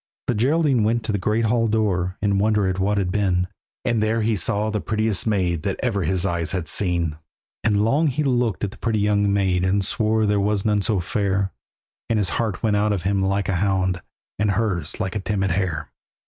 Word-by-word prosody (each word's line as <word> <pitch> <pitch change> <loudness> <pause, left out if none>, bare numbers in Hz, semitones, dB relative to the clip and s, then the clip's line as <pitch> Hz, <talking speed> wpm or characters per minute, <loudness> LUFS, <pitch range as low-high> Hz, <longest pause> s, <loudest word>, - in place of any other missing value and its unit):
The - - +1
Geraldine 135 +1 +2
went 115 +2 +1
to 110 - -1
the 100 - -1
great 110 +4 +1
hall 115 +1 +2
door, 95 -4 0
In 100 -1 +2
wonder 105 -1 +2
at 95 0 -1
what 100 +2 +1
had 95 -3 0
been, 90 -3 +1 0.4
And 115 -2 +1
there 110 +1 +1
he 110 0 +1
saw 105 +3 0
the 105 -1 -2
prettiest 110 -1 0
maid 90 -6 +1
That 100 +2 -3
ever 110 -6 0
his 90 +2 0
eyes 85 -2 -1
had 90 -4 -2
seen. 85 -4 0 0.5
And 105 -1 +2
long 145 +8 +2
he 145 +2 0
looked 120 -6 0
at 100 - -1
the - - -15
pretty 115 -2 0
young 105 -1 +2
maid, 95 -3 +1
And 95 +1 +1
swore 110 +1 +1
there 105 0 +2
was 100 0 0
none 105 -1 +2
so 100 0 0
fair; 95 +1 -1 0.6
And 115 - +2
his 100 -4 +2
heart 110 -3 -2
went 105 -2 +2
out 105 +1 +2
of 95 -4 -3
him 100 +1 +1
like 100 +1 0
a 95 - 0
hound, 95 -2 0 0.4
And 105 0 +2
hers 95 -6 -1
like 95 +2 -2
a - - 0
timid 95 -1 -1
hare. 90 -3 -2
100 Hz, 220 wpm, -22 LUFS, 95-110 Hz, 0.6 s, Geraldine